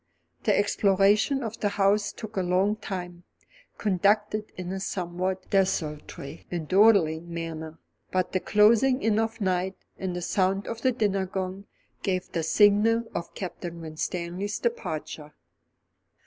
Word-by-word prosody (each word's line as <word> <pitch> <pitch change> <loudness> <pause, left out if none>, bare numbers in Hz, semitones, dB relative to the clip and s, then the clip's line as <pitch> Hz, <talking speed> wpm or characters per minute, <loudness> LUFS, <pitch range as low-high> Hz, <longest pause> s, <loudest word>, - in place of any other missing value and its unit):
The - - +3
exploration 205 +6 +3
of 225 0 -5
the 205 - +1
house 205 +1 +2
took 220 -1 -9
a 190 - +1
long 185 +3 +2
time, 180 -4 -6 0.5
conducted 210 +2 +1
in 180 -1 -5
this 190 0 -3
somewhat 185 +1 -3
desultory 155 -5 -1
and 170 -3 -4
dawdling 175 -5 +4
manner; 160 -1 -5 0.3
but 185 -1 0
the 185 - +1
closing 230 +7 +4
in 220 0 +3
of 225 0 -1
night 185 -1 0 0.2
and 185 -2 -3
the 175 - -4
sound 195 +2 +1
of 230 0 -5
the 260 - +3
dinner 200 -5 0
gong 190 +1 -4 0.3
gave 185 -2 -2
the 165 - -1
signal 210 +6 +4
for 170 - -2
Captain 175 -2 -6
Winstanley's 175 +5 -3
departure. 155 - -4
190 Hz, 135 wpm, -27 LUFS, 175-210 Hz, 0.5 s, dawdling